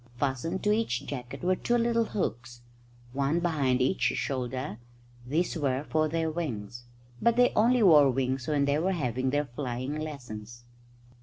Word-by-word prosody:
Fastened 140 +7 -2
to 210 - +3
each 210 - 0
jacket 125 0 -6
were 185 +1 +3
two 240 +5 0
little 230 -1 +2
hooks, 120 - -4 0.5
one 140 +4 +1
behind 140 -7 +1
each 160 +9 0
shoulder 130 -3 -2 0.5
these 165 +8 0
were 140 -3 0
for 155 0 +1
their 160 0 -1
wings. 120 -8 -5 0.4
But 235 -1 +3
they 245 0 +4
only 240 +2 +4
wore 150 -7 +7
wings 130 0 -1
when 145 -2 +2
they 140 +1 +1
were 190 +4 +1
having 130 -5 -1
their 145 +2 +1
flying 130 +1 -4
lessons. 120 -6 -7
140 Hz, 155 wpm, -28 LUFS, 125-170 Hz, 0.5 s, wore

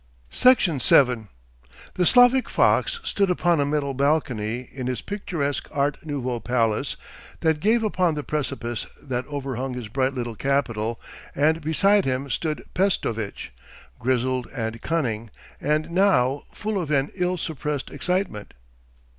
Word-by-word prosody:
Section 210 - +4
7 125 -3 +4 0.7
The 180 -2 +2
Slavic 245 +1 +5
fox 475 - +2
stood 200 - +1
upon 175 -2 +2
a 140 - +2
metal 145 -2 -1
balcony 125 -5 0
in 130 -2 -4
his 125 -2 -2
picturesque 165 -8 -3
Art 140 0 -1
Nouveau 130 -5 -3
palace 115 -3 0 0.4
that 160 -2 +2
gave 225 +6 +2
upon 185 -6 +1
the 150 - -3
precipice 130 -7 -3
that 130 -2 -4
overhung 135 -3 -4
his 120 -4 -6
bright 130 +3 0
little 120 -2 -3
capital, 115 -3 -1 0.4
and 160 +3 +2
beside 195 +6 +3
him 130 +1 -2
stood 155 +5 -2
Pestovitch, 115 - -1 0.5
grizzled 130 0 0
and 115 -1 -3
cunning, 115 -9 -1 0.3
and 155 +3 0
now 145 -8 +2
full 210 -2 -2
of 160 - -5
an 140 -1 +1
ill 180 -1 0
suppressed 150 -4 -4
excitement. 180 - -2
140 Hz, 135 wpm, -24 LUFS, 125-170 Hz, 0.7 s, Slavic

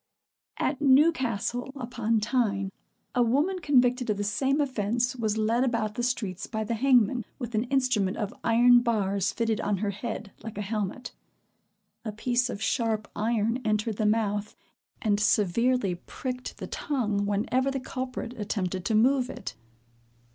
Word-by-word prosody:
At 290 - -1
Newcastle 260 -4 +2
upon 235 -4 -1
Tyne, 205 -5 0 0.4
a 250 - +2
woman 290 +11 +2
convicted 250 -5 +2
of 210 - +1
the 205 - -1
same 265 +8 +1
offence 240 -2 0
was 220 -3 -1
led 225 +3 +2
about 230 -4 0
the 240 - -3
streets 210 -7 -2
by 220 -1 -2
the 215 - -2
hangman, 245 -1 +3
with 240 -3 -6
an 220 +2 +1
instrument 250 -7 +1
of 210 -3 -3
iron 240 +1 +6
bars 200 -5 0
fitted 225 -2 -1
on 205 -1 0
her 200 +1 -1
head, 210 0 -5
like 220 -2 -8
a 210 - -2
helmet. 210 +4 -3 0.9
A 220 - -3
piece 245 +3 0
of 220 -3 -4
sharp 220 -2 0
iron 225 +2 0
entered 215 0 0
the 215 - +1
mouth, 210 -1 0 0.5
and 205 -2 +2
severely 210 +1 +2
pricked 250 +8 -6
the - - -6
tongue 210 -8 -1
whenever 245 +6 +1
the 270 0 -2
culprit 255 -2 -5
attempted 190 -3 -2
to 220 - +1
move 255 +3 +3
it. - - -6
230 Hz, 155 wpm, -27 LUFS, 210-250 Hz, 0.9 s, iron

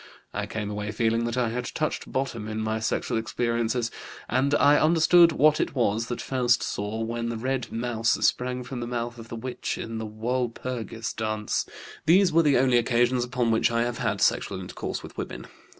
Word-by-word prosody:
I - - -3
came 105 -2 -4
away 105 0 -3
feeling 115 +1 +1
that 120 +1 -2
I 120 -2 +1
had 125 +2 -3
touched 155 +5 -3
bottom 120 -5 -2
in 110 0 -3
my 110 0 -1
sexual 110 +1 -1
experiences, 115 +1 -1 0.4
and 135 +3 +2
I 145 0 +5
understood 170 +2 +6
what 155 0 +4
it - - -2
was 115 -2 +1
that 120 - -4
Faust 120 -4 +2
saw 105 +3 -3
when 115 +1 -2
the 115 - -3
red 130 +2 -2
mouse 115 -1 0
sprang 125 0 0
from 125 0 -6
the 120 - -4
mouth 120 0 -4
of 115 - -10
the 115 - -7
witch 125 +2 -4
in 115 0 -5
the 110 - -4
Walpurgis 115 0 -3
dance. 110 -1 -2 0.4
"These 180 +1 +5
were 165 - +6
the 145 -5 +4
only 125 -1 +4
occasions 120 +1 +2
upon 125 -1 0
which 110 - +3
I 115 0 +1
have 120 0 -3
had - - -1
sexual - - +1
intercourse - - -5
with - - -10
women. - - -5
120 Hz, 195 wpm, -26 LUFS, 115-130 Hz, 0.4 s, understood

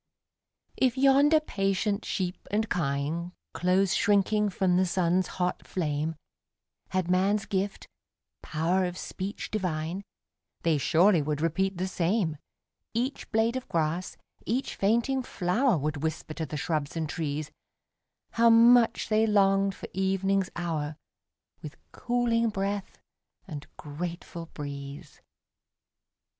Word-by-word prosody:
If 260 -1 +2
yonder 280 +3 +5
patient 200 -5 -1
sheep 180 -1 -3
and 215 +2 0
kine, 160 +2 -1 0.2
Close 185 +1 +2
shrinking 205 +1 +3
from 185 -1 +1
the 185 +1 +3
sun's 180 +1 +1
hot 180 -1 -1
flame, 155 -2 -2 0.7
Had 185 -2 -1
man's 195 +3 +2
gift 195 0 -2 0.5
"power 170 +4 0
of 180 0 -4
speech 195 +2 -5
divine," 180 -2 -2 0.6
They 160 -3 +2
surely 175 +4 +4
would 145 0 -2
repeat 180 +4 0
the 185 +2 -1
same 175 -2 0 0.6
Each 250 +4 -2
blade 225 +2 +2
of 260 - -4
grass, 165 +2 -1 0.3
each 250 +5 -2
fainting 235 +6 +1
flower, 220 +1 +1
Would 150 +1 -2
whisper 160 0 -3
to 160 0 -4
the 150 - -5
shrubs 155 0 -2
and 160 -1 -1
trees, 150 0 -3 0.8
How 230 +1 +4
much 230 +1 +6
they 220 +1 +3
longed 195 -1 +3
for - - -8
evening's 195 0 +1
hour, 160 -3 -2 0.7
With - - -9
cooling 235 -1 +1
breath 200 -1 -3 0.5
and 150 -5 -7
grateful 170 +2 -6
breeze. 140 -2 -8
185 Hz, 120 wpm, -28 LUFS, 160-210 Hz, 0.8 s, much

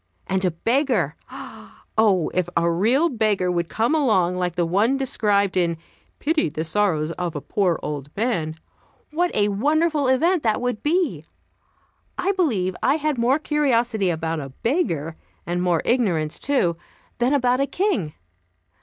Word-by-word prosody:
And 190 0 -1
a 185 - +3
beggar! 255 - 0 0.8
Oh, 200 -7 +3
if 180 -1 0
a 170 0 +2
real 235 - +2
beggar 215 - 0
would 170 -1 -1
come 230 +6 0
along, 210 - +2
like 180 -2 -2
the 175 -1 +1
one 205 +10 +2
described 205 -7 +1
in 170 -2 +1 0.4
"Pity 310 - 0
the 155 +1 -4
sorrows 165 -4 0
of 175 -2 -3
a - - -2
poor 180 +2 0
old 145 -2 -5
man," 180 -9 -1 0.6
what 350 +3 +1
a 205 0 +2
wonderful 295 +7 +1
event 325 +7 +2
that 220 -4 +1
would 245 -3 -2
be! 345 +4 0 0.9
I 365 +2 +1
believe 225 - 0
I 275 - +3
had 305 -4 -1
more 250 +4 +3
curiosity 245 - +1
about 160 -1 -2
a 140 -2 -6
beggar, 165 - -2 0.3
and 175 +1 -2
more 175 -3 +1
ignorance, 175 -11 0
too, 185 -12 +1 0.4
than 245 +2 +2
about 250 -2 +2
a 275 - +1
king. 250 - -1
210 Hz, 155 wpm, -22 LUFS, 175-275 Hz, 0.9 s, a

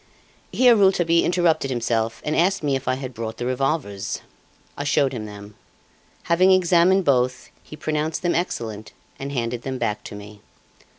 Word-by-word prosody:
Here 250 -2 +5
Rouletabille 180 -5 +3
interrupted 170 -5 +1
himself 115 -2 -1
and 150 - 0
asked 185 +1 +2
me 140 -2 +1
if 135 -1 -5
I 130 - +2
had 130 -1 -6
brought 110 -1 -5
the 120 - -4
revolvers. 130 -5 -2 0.5
I 145 - -4
showed 145 -2 +1
him 110 -4 -5
them. 105 0 -11 0.7
Having 185 +3 +4
examined 185 +1 +4
both, 125 -2 +1
he - - -11
pronounced 155 +2 -2
them 175 - +1
excellent, 110 - -3 0.3
and 140 +1 -5
handed 120 -2 -2
them 130 +1 -4
back 105 -4 -2
to - - -8
me. 105 0 -11
135 Hz, 165 wpm, -23 LUFS, 115-170 Hz, 0.7 s, Here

